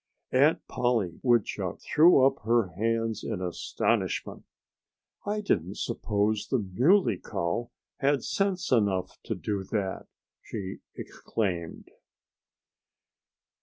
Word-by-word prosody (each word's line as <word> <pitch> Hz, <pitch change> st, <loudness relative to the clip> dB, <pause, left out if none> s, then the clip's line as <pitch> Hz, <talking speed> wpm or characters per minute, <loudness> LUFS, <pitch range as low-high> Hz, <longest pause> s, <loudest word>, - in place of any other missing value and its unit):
Aunt 140 Hz, +5 st, +3 dB
Polly 115 Hz, -9 st, 0 dB
Woodchuck 120 Hz, -4 st, +1 dB
threw 155 Hz, -4 st, +5 dB
up 135 Hz, -, +3 dB
her 115 Hz, -3 st, +2 dB
hands 115 Hz, +4 st, -1 dB
in 110 Hz, -5 st, -3 dB
astonishment. 90 Hz, -2 st, -1 dB, 0.8 s
"I 210 Hz, +1 st, -1 dB
didn't 95 Hz, -, -1 dB
suppose 105 Hz, 0 st, -1 dB
the 130 Hz, -, +1 dB
Muley 115 Hz, -, +3 dB
Cow 85 Hz, +8 st, -3 dB, 0.3 s
had 140 Hz, -2 st, +1 dB
sense 195 Hz, -2 st, -1 dB
enough 100 Hz, -6 st, +1 dB
to -, -, -2 dB
do 100 Hz, -2 st, -3 dB
that!" 95 Hz, -2 st, -3 dB, 0.3 s
she 95 Hz, -3 st, -6 dB, 0.2 s
exclaimed. 90 Hz, -7 st, -4 dB
110 Hz, 100 wpm, -28 LUFS, 95-130 Hz, 0.8 s, threw